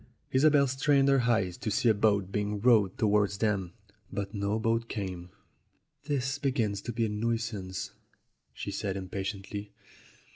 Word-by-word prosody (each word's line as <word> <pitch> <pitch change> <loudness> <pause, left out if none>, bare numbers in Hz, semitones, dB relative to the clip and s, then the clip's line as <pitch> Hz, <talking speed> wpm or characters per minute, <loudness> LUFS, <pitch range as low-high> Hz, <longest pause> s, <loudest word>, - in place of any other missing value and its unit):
Isobel 145 +1 +5
strained 135 +1 +2
her 135 -1 +4
eyes 105 -7 +1
to 110 - -3
see 110 +3 +1
a 110 - +6
boat 100 -2 +1
being 105 0 -1
rowed 105 -4 +4
towards 105 -2 +2
them, 95 -5 0 0.4
but 100 +1 -4
no 100 +1 -1
boat 115 +1 0
came. 90 -4 -5 0.8
"This 140 -1 -1
begins 115 -8 0
to 120 - -4
be 115 0 0
a - - -2
nuisance," 105 -3 -3 0.6
she - - -6
said 100 -1 -3
impatiently. 100 +2 -5
105 Hz, 145 wpm, -29 LUFS, 100-120 Hz, 0.8 s, a